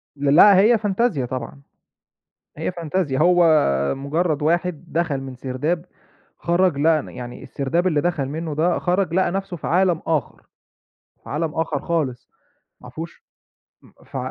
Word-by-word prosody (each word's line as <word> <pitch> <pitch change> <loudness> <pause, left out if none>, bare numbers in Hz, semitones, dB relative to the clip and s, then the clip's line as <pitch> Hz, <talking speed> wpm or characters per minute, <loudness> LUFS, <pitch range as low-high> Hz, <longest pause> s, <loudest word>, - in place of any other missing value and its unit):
ل 140 0 +1
لأ 200 +2 +8
هي 220 +4 +5
فانتازيا 205 - 0
طبعًا، 130 +2 -6 1.0
هي 160 +3 -2
فانتازيا 165 -4 -2
هو 175 +1 +5 0.5
مُجرّد 150 +2 -1
واحد 170 +1 0
دخل 165 -4 -1
من 130 -1 -8
سرداب 145 +7 -3 0.5
خرج 175 -2 +1
لقى 155 +1 +3
ن - - -11
يعني 120 -1 -9
السرداب 165 +7 -1
اللي 150 -4 +1
دخل 170 -6 -1
منه 155 +2 -4
ده، 170 +3 +1
خرج، 180 -1 0
لقى 185 -1 +2
نفسه 195 -2 -4
في - - -6
عالم 175 -1 +2
آخر، 155 -7 -1 0.8
في - - -10
عالم 155 +2 -2
آخر 155 -3 -1
خالص، 150 -8 -3 0.5
ما 125 - -12
فيهوش 160 +5 -8 0.6
امم، - - -20
ف - - -7
165 Hz, 150 wpm, -22 LUFS, 140-175 Hz, 1.0 s, لأ